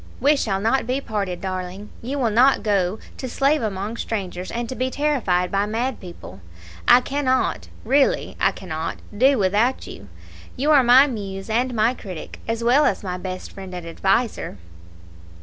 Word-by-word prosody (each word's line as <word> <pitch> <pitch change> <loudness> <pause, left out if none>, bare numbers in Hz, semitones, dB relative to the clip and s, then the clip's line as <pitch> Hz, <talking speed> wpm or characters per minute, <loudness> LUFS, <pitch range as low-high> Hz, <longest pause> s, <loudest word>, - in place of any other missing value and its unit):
"We 285 +4 +4
shall 200 -8 -1
not 225 +4 +1
be 255 +2 0
parted, 200 -8 -3
darling; 185 +1 -5
you 265 +5 -4
will 240 -5 +1
not 255 +5 +4
go 200 -2 +1 0.2
to 260 - -5
slave 280 +4 +2
among 210 +1 -3
strangers 185 -6 -4
and 235 0 -3
to 260 - -5
be 255 0 -1
terrified 245 -12 0
by 200 +1 +1
mad 235 +4 -2
people. 170 - -11 0.5
I 250 - +8
cannot 260 -1 0 0.2
really, 270 +4 +2
I - - +3
cannot 165 -3 -5 0.2
do 265 +5 +4
without 210 +6 +1
you 100 0 -11 0.5
you 290 +4 +2
are 290 -3 +7
my 250 +3 +7
muse 200 -5 -5
and 245 +2 0
my 220 +3 +3
critic, 185 -9 -9
as 230 +1 -2
well 260 +6 +4
as - - 0
my 180 -2 -4
best 185 0 -6
friend 190 -2 -9
and 175 -1 -6
adviser." 195 - -1
220 Hz, 170 wpm, -22 LUFS, 190-255 Hz, 0.5 s, I